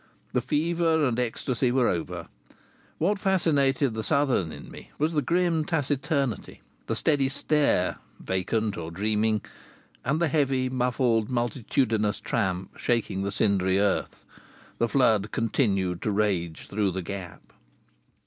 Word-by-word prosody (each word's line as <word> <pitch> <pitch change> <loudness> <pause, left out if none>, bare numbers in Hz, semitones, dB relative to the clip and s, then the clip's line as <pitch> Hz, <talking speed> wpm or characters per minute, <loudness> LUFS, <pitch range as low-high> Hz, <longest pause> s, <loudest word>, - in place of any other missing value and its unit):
The - - +2
fever 165 0 +1
and 125 -3 +1
ecstasy 125 +1 0
were 125 -1 +3
over. 85 -2 -3 0.7
What 195 +5 +1
fascinated 145 - +2
the 110 - -3
Southern 125 - +1
in 75 -1 -10
me - - -11
was 155 +3 0
the 150 - +2
grim 170 -1 +1
taciturnity, 145 - -1 0.2
the - - -1
steady 140 -3 +2
stare 145 -8 +1 0.2
(vacant 100 +3 -1
or 80 -1 -5
dreaming), 105 +4 0 0.6
and 140 +5 0
the 170 - +2
heavy, 135 -3 +1
muffled, 125 -3 +1
multitudinous 120 -3 0
tramp 95 -4 -2
shaking 115 -5 0
the 100 +1 -2
cindery 95 -2 +2
earth. 100 -1 -1 0.5
The 115 - +2
flood 110 -6 +3
continued 100 -7 0
to - - -1
rage 100 -6 -1
through 105 -1 0
the 95 0 -3
gap. 95 -1 -8
120 Hz, 130 wpm, -26 LUFS, 100-140 Hz, 0.7 s, were